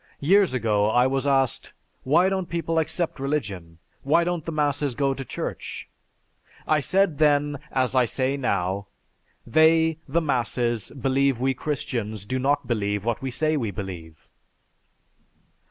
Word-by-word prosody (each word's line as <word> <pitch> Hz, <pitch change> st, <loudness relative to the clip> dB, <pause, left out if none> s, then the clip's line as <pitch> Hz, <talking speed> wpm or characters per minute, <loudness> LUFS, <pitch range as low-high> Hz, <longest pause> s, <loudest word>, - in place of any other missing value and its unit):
Years 195 Hz, +6 st, +4 dB
ago 105 Hz, -3 st, +1 dB
I 120 Hz, +3 st, +4 dB
was 135 Hz, +1 st, 0 dB
asked, 135 Hz, -2 st, +1 dB, 0.3 s
'Why 165 Hz, +7 st, +3 dB
don't 190 Hz, -2 st, -2 dB
people 165 Hz, -1 st, -1 dB
accept 160 Hz, -1 st, -2 dB
religion? 100 Hz, -, -3 dB, 0.2 s
Why 160 Hz, +5 st, +3 dB
don't 175 Hz, -2 st, -2 dB
the 165 Hz, -, -4 dB
masses 145 Hz, -3 st, 0 dB
go 140 Hz, 0 st, +1 dB
to 135 Hz, -, -6 dB
Church?' -, -, -6 dB, 0.8 s
I 155 Hz, -, +3 dB
said 175 Hz, +1 st, +1 dB
then, 145 Hz, -1 st, +2 dB
as 130 Hz, -1 st, +1 dB
I 130 Hz, -2 st, +4 dB
say 130 Hz, +3 st, -1 dB
now, 100 Hz, -6 st, -1 dB, 0.6 s
'They, 160 Hz, +4 st, +4 dB
the 155 Hz, +5 st, +1 dB
masses, 120 Hz, -5 st, -1 dB
believe 135 Hz, 0 st, +1 dB
we 135 Hz, +1 st, +1 dB
Christians 115 Hz, -7 st, -4 dB
do 130 Hz, +4 st, -2 dB
not 140 Hz, +1 st, +1 dB
believe 105 Hz, -3 st, -1 dB
what 120 Hz, +1 st, -1 dB
we 135 Hz, -, -3 dB
say 155 Hz, +5 st, 0 dB
we 120 Hz, -7 st, -1 dB
believe." 90 Hz, -6 st, -8 dB
135 Hz, 145 wpm, -24 LUFS, 115-155 Hz, 0.8 s, Years